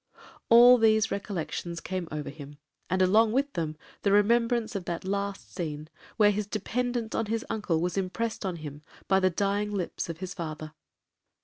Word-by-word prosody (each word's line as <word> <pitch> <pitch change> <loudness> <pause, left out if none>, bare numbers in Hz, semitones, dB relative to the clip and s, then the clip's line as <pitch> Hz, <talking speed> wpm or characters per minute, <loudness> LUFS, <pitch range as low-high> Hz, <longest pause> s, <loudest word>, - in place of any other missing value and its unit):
All 245 +2 +8
these 220 -1 +3
recollections 175 -3 -4
came 185 -1 -4
over 150 -2 -4
him, 145 0 -11 0.3
and 185 +1 +2
along 215 +4 +4
with 275 +2 0
them 155 -3 -3 0.2
the 200 - +2
remembrance 230 +2 +3
of 195 -4 -4
that 170 +1 -4
last 200 0 -3
scene, 155 -4 -5 0.3
where 210 -1 +6
his 205 0 -2
dependence 240 +2 -2
on 225 - -1
his 225 +1 -2
uncle 210 -7 0
was 180 +3 -1
impressed 220 +5 -3
on 185 -3 -2
him 150 -2 -8 0.3
by 190 0 +4
the 185 -1 +3
dying 200 +3 0
lips 185 -3 -3
of 165 - -5
his 185 +1 -6
father. 155 -3 -6
195 Hz, 175 wpm, -28 LUFS, 170-220 Hz, 0.3 s, All